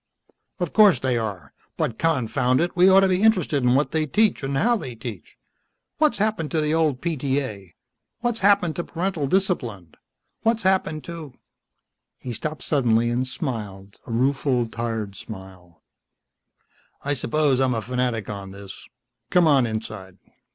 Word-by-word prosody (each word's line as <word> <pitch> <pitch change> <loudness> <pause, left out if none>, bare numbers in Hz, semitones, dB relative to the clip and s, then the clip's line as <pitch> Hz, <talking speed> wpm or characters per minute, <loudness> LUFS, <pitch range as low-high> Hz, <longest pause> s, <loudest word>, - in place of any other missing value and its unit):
"Of 175 -4 -3
course 210 - +6
they 130 0 0
are. 100 -10 -4 0.2
But 110 - -2
confound 130 -4 +1
it, 175 +1 -1
we 180 +2 +6
ought 190 +1 +7
to 195 - +4
be 185 0 +1
interested 180 -10 +3
in 125 0 +3
what 145 +2 +1
they 155 -1 0
teach 215 +6 +2
and 135 0 -2
how 240 - +3
they 130 - -6
teach. 110 -4 -9 0.6
What's 305 -1 +3
happened 210 -7 0
to 160 - 0
the 150 0 0
old 155 -5 +1
PTA? 130 - -3 0.5
What's 240 -2 0
happened 195 -5 +3
to 175 - -1
parental 170 -4 -2
discipline, 120 - -1 0.5
what's 225 0 +1
happened 185 -5 +1
to 165 -6 -8 0.4
" - - -57
He 125 - -4
stopped 155 +7 -5
suddenly 120 -5 +2
and 125 +2 -1
smiled, 100 -7 -6
a - - -6
rueful 130 +1 +1
tired 115 -3 -4
smile. 95 -5 -11 1.2
"I 145 - +1
suppose 140 +1 +1
I'm 130 -2 +2
a 115 - -1
fanatic 125 -3 -2
on 100 -2 -6
this. 100 0 -11 0.4
Come 180 -2 +4
on 140 -6 +4
inside." 110 -4 -6
130 Hz, 160 wpm, -23 LUFS, 115-170 Hz, 1.2 s, ought